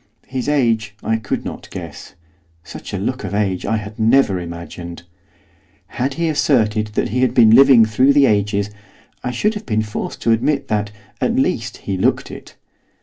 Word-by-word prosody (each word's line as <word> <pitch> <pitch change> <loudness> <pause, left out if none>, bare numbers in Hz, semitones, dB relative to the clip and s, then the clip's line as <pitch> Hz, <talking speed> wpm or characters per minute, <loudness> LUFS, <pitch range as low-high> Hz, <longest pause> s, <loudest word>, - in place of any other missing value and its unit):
His 130 +1 -3
age 115 -7 +1
I 110 - +1
could 110 -3 -4
not - - -7
guess; - - -9 0.5
such - - -9
a - - -3
look - - -3
of - - -4
age 100 -3 -1
I 110 +1 +1
had 105 +1 -8
never 110 -4 +3
imagined. 85 0 -8 0.9
Had 135 +2 -2
he 170 0 -1
asserted 110 -8 +1
that - - 0
he 125 +4 -1
had 130 -1 +1
been 115 -3 +6
living 130 -1 +7
through 130 +6 +3
the 140 -1 +5
ages, 105 -2 0 0.5
I 125 - -2
should 205 - 0
have 210 - -8
been 110 -2 0
forced 105 -1 -5
to 115 - +3
admit 135 +5 0
that, 105 -1 0 0.3
at 235 - +1
least, 120 - -1
he 95 -2 -2
looked - - 0
it. - - -11
110 Hz, 180 wpm, -19 LUFS, 105-135 Hz, 0.9 s, living